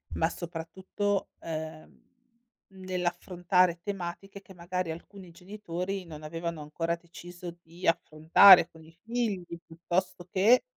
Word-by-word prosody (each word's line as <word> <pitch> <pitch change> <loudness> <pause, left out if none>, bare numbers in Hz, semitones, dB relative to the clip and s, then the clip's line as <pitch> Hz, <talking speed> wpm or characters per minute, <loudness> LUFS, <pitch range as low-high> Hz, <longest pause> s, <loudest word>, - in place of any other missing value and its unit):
Ma, 160 +1 +2
soprattutto, 185 +4 -3
ehm, 160 -1 -7 0.7
nell'affrontare 180 -1 0
tematiche 195 0 -6
che, 190 - -15
magari, 175 -1 -3
alcuni 180 +2 -10
genitori 185 0 -5
non 155 -2 -10
avevano 165 0 -4
ancora 165 +3 -2
deciso 175 0 -10
di 170 +3 -7
affrontare 165 +3 +7
con 160 -1 -16
i 165 +1 -18
figli, 225 -6 -2 0.2
piuttosto 175 +2 -3
che, 215 +6 +5
175 Hz, 110 wpm, -29 LUFS, 165-190 Hz, 0.7 s, affrontare